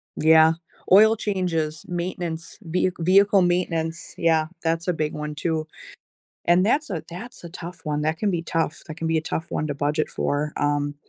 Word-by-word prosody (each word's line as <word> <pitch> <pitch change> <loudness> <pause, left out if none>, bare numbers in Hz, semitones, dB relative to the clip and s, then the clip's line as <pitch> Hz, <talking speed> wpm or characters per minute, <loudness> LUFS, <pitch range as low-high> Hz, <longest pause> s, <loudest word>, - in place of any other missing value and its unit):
Yeah. 160 0 +6 0.4
Oil 215 +4 +7
changes, 170 -8 -2
maintenance, 175 -2 -4
vehic 180 +2 0
vehicle 195 +3 +5
maintenance. 170 -2 -1
Yeah, 160 -2 +2 0.2
that's 165 +1 0
a 180 - +2
big 155 -2 -2
one 150 0 -5
too. 160 0 -2 0.8
And 175 +2 +4
that's 285 +8 +1
a 165 -5 -3
that's 205 +8 -9
a 170 - -6
tough 175 0 -9
one. 150 -1 -1
That 155 +1 0
can 210 - +1
be 170 -3 -1
tough. 165 -2 -2
That 155 -1 -8
can 165 - -3
be 160 - +2
a - - 0
tough 160 +1 -3
one 155 - -1
to 145 - -3
budget 150 +2 0
for, 150 +1 -1
um 145 0 0
165 Hz, 185 wpm, -24 LUFS, 155-180 Hz, 0.8 s, Oil